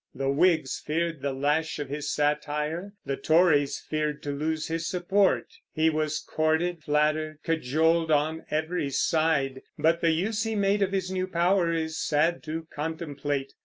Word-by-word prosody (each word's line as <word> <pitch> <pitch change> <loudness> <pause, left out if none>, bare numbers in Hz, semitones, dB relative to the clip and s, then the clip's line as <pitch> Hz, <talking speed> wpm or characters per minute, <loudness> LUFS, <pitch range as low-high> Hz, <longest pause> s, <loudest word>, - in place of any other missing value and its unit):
The 135 0 0
Whigs 160 -2 +2
feared 165 -1 -1
the 140 - -1
lash 145 +4 0
of 145 -2 -4
his 145 +1 -3
satire; 150 +5 -1
the 140 - -1
Tories 155 -4 +3
feared 150 -1 -3
to 145 - -3
lose 155 +2 -2
his 165 0 -2
support. 190 +2 +2 0.3
He 160 0 +3
was 155 0 -1
courted, 160 +2 0
flattered, 155 +1 +1
cajoled 160 +2 +1
on 155 +2 +1
every 155 0 -1
side; 140 -3 +1 0.2
but 165 +1 +2
the 165 - +3
use 200 +7 0
he 225 0 -1
made 200 0 +2
of 195 -1 +2
his 190 -1 -1
new 185 0 -1
power 175 0 +2
is 160 -1 -2
sad 160 +3 +1
to 160 +1 -5
contemplate. 145 -3 -3
160 Hz, 160 wpm, -27 LUFS, 150-170 Hz, 0.3 s, Tories